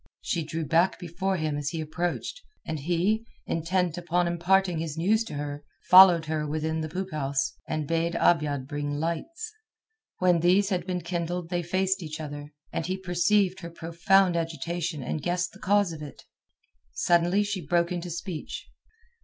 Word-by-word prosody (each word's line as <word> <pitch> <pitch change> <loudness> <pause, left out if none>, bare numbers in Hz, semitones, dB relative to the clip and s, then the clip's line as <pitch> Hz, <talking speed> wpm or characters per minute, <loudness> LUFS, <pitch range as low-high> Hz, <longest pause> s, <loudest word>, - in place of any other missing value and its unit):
She 170 - -1
drew 160 +1 -4
back 170 +5 +3
before 185 +3 -2
him 155 -2 -1
as 145 -1 -2
he 165 - -4
approached, 175 - -3 0.2
and 160 -1 -3
he, 175 +8 +1 0.2
intent 175 +1 0
upon 175 +1 +1
imparting 175 +1 +2
his 160 -1 -4
news 210 +7 +2
to 150 - -7
her, 145 0 -5 0.3
followed 180 -3 +9
her 155 -1 -2
within 160 +1 -1
the 155 - -4
poop 185 +3 -4
house, 140 -2 -1
and 155 -2 -2
bade 165 +1 0
Abiad 145 -5 +2
bring 145 0 -3
lights. 325 - -3 0.6
When 180 -2 +3
these 185 +4 +4
had 180 -3 -1
been 180 -1 -2
kindled 175 0 -3
they 175 -1 0
faced 190 +3 0
each 155 -1 -6
other, 145 -1 -7 0.2
and 165 - -2
he 185 +1 -1
perceived 185 +1 +2
her 170 - -7
profound 170 +3 +2
agitation 165 -1 -2
and 150 +4 -3
guessed 180 +2 -1
the 195 - -16
cause 200 -3 +2
of 155 - -8
it. 145 -3 -9 0.7
Suddenly 175 +4 +3
she 200 -3 -3
broke 170 +4 +1
into 175 0 -3
speech. 170 -1 -6
170 Hz, 170 wpm, -27 LUFS, 155-185 Hz, 0.7 s, followed